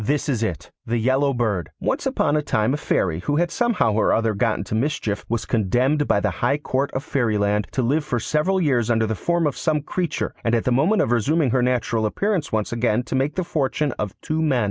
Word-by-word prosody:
This 145 +7 0
is 125 -6 0
it: 95 -8 -3
The 120 +1 -1
Yellow 130 +4 +2
Bird 110 - -1
Once - - -1
upon 145 - +1
a 150 - +2
time 110 -4 0
a - - 0
Fairy, 85 - 0
who 145 +11 -1
had 170 +2 +1
somehow 235 - +1
or 105 - +2
other 115 -1 +2
got 110 +2 +1
into 100 - -5
mischief, 110 -4 -1
was 115 0 -1
condemned 125 +7 +1
by - - +3
the - - 0
High 140 +4 0
Court 140 -1 -1
of 130 - -3
Fairyland 105 - 0
to 130 - 0
live 145 +6 +1
for 125 -5 -2
several 155 - 0
years 125 -9 +1
under 110 -1 +2
the 110 - -1
form 170 - 0
of 145 - 0
some 155 -3 0
creature, 175 0 -2
and 115 0 +2
at 115 - 0
the 125 - 0
moment 155 - +3
of 115 - -2
resuming 135 +4 +2
her 130 - +2
natural 120 -3 +1
appearance 190 - -1
once 110 -1 -1
again 120 0 +1
to 135 - -4
make 135 +3 0
the 185 - 0
fortune 150 -2 -1
of 105 -3 -4
two 155 +1 -2
men. 145 -6 +2
125 Hz, 235 wpm, -22 LUFS, 110-150 Hz, -, by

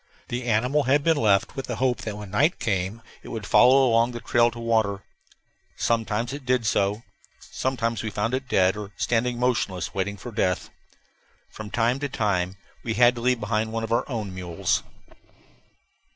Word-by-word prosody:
The 120 +1 -3
animal 125 +6 +1
had 140 +3 +3
been 165 -1 +3
left 105 -1 +2
with 135 - -5
the 120 - -3
hope 125 +1 0
that 105 -2 -5
when 105 -2 -9
night 150 - +2
came 105 -1 -2 0.2
it - - -13
would 110 -3 -5
follow 130 +4 +6
along 115 +1 +3
the 120 - -5
trail 120 0 +3
to 120 - -12
water. 110 -4 0 0.7
Sometimes 115 +1 0
it 140 0 -7
did 125 -2 +1
so. 105 +1 +1 0.4
Sometimes 115 -4 -2
we 110 - -3
found 105 +4 -2
it 130 0 -2
dead, 95 -3 +3
or 105 -1 -7
standing 120 +1 0
motionless 120 -7 -1
waiting 100 +1 -2
for 120 +5 -8
death. 95 -5 -1 0.8
From 110 -1 -8
time 120 +4 +1
to 145 0 -3
time 95 -6 -1 0.2
we 115 -2 -3
had 120 +1 +6
to 120 - -7
leave 125 0 +2
behind 110 +1 -1
one 115 0 -3
of 115 - -5
our 115 - +1
own 110 -7 -4
mules. 90 -3 -1
115 Hz, 180 wpm, -25 LUFS, 105-125 Hz, 0.8 s, follow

